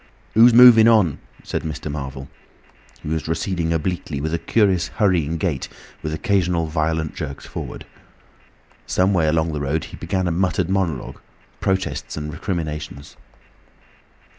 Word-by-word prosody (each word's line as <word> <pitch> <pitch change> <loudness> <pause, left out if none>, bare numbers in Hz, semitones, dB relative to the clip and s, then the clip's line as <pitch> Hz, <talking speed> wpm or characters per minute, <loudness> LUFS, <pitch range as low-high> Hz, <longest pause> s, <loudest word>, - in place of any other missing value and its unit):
"Who's 115 +3 +7
moving 120 -2 +8
on?" 105 - +4 0.2
said - - -3
Mr. 75 -1 -5
Marvel. 70 -2 -6 0.8
He - - -7
was 80 0 -2
receding 85 0 -1
obliquely 80 -2 -2
with 80 +3 -3
a 85 - 0
curious 95 -5 +2
hurrying 85 -6 +1
gait, 80 -6 -2 0.3
with 75 - -4
occasional 90 -2 0
violent 80 0 -1
jerks 70 -4 -6
forward. - - -7 1.0
Some 95 +2 +2
way 85 -4 +2
along 80 +1 +1
the 75 - -3
road 70 +3 -1
he - - -10
began 95 -1 -2
a - - 0
muttered 90 +1 0
monologue, 90 -9 -2 0.4
protests 95 -3 -2
and 75 0 -5
recriminations. 75 -5 -5
80 Hz, 140 wpm, -21 LUFS, 75-95 Hz, 1.0 s, moving